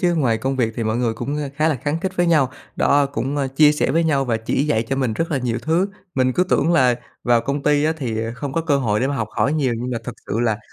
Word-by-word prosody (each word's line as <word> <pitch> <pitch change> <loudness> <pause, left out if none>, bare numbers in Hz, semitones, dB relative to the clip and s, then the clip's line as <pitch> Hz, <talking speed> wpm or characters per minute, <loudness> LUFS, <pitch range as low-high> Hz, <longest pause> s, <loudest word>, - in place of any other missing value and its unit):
chứ. 175 -2 +2
Ngoài 120 -8 +1
công 135 0 -2
việc 115 -3 0
thì 115 - -2
mọi 110 +1 0
người 120 -2 0
cũng, 135 +6 -3
ờ, 145 -2 -3
khá 155 +1 +2
là 155 - +1
khăng 150 +3 -1
khít 190 +1 -3
với 175 0 +2
nhau, 150 -6 +3 0.3
đó, 140 0 +3
cũng, 140 +1 -3
ơ, 135 -2 0
chia 150 -1 +6
sẻ 150 - 0
với 165 +3 +2
nhau 140 -4 +2
và 115 -3 0
chỉ 115 +5 -1
dạy 115 -7 +1
cho 135 - -1
mình 130 -5 0
rất 165 +10 -2
là 140 - +1
nhiều 120 -2 -2
thứ. 170 +5 +1 0.3
Mình 130 -1 +2
cứ 180 - +2
tưởng 165 -2 +2
là 130 -6 +4 0.3
vào 120 -1 +4
công 140 +2 -3
ty 150 0 +2
á, 160 - +2
thì, 115 -6 -3
à, 115 - -4
không 135 +1 -5
có 165 - 0
cơ 155 -4 +1
hội 105 -5 0
để 130 - +2
mà 140 0 -2
học 110 -3 -2
hỏi 140 - 0
nhiều, 140 -5 +1
nhưng 125 +1 -4
mà 120 - -2
thật 125 - -5
sự 110 +4 -1
là, 110 -3 +1
135 Hz, 310 wpm, -21 LUFS, 120-150 Hz, 0.3 s, chia